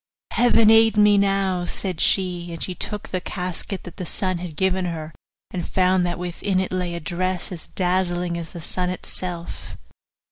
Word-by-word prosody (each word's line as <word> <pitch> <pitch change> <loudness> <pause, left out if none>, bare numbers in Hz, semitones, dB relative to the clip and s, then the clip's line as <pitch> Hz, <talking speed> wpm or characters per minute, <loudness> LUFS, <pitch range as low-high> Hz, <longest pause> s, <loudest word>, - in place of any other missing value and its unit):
'Heaven 230 -2 +5
aid 225 -1 +6
me 210 0 +6
now!' 195 -2 +2
said 180 -1 -2
she; 180 -3 +2
and 165 - -3
she 185 - -3
took 210 +3 -3
the 185 - -2
casket 185 +1 -4
that 175 - -10
the 185 - -4
sun 185 0 0
had 170 -3 -6
given 190 +1 +1
her, 160 -2 -4 0.4
and 180 -2 -4
found 185 -1 +3
that 175 - -2
within 180 +2 -1
it 190 - -1
lay 180 -2 -1
a - - -3
dress 180 +3 -2
as 170 -3 -7
dazzling 180 -1 0
as 170 -2 -5
the 170 - -8
sun 180 +2 -1
itself. 180 -1 -5
180 Hz, 180 wpm, -23 LUFS, 175-190 Hz, 0.4 s, aid